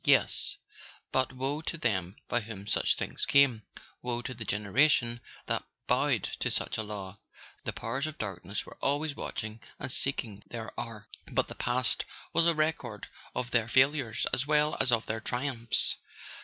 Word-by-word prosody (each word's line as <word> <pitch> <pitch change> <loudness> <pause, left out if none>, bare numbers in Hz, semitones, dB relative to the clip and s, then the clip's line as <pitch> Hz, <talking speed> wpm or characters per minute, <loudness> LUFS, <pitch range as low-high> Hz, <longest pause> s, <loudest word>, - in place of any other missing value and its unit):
Yes—but 130 0 0
woe 135 +4 -2
to 165 - -3
them 95 - 0
by 120 - +2
whom 105 -2 -7
such - - +2
things - - -3
came; 140 -6 +5 0.4
woe 120 -1 -2
to 130 - -4
the 115 -2 -6
generation 115 +4 +3 0.2
that - - 0 0.2
bowed - - +3 0.2
to - - +1
such - - -1
a - - +2
law! 100 -2 -6 0.5
The - - 0
Powers 130 +6 -2
of 155 0 -6
Darkness 100 -1 -4
were - - -13
always 145 +1 +1
watching 110 -4 -5 0.2
and 130 - -4
seeking 115 -7 -1
their 115 -2 -6
hour; 110 -3 -5 0.2
but - - +1
the - - -5
past 125 0 +1 0.3
was 165 0 +5
a 170 - +4
record 155 - -1 0.3
of 125 -1 -2
their 115 -2 +3
failures 130 -2 +3
as 135 +3 +2
well 150 0 +3
as 130 - +4
of 115 -1 +3
their 110 +1 -2
triumphs. 120 -1 +2
120 Hz, 165 wpm, -30 LUFS, 110-140 Hz, 0.5 s, came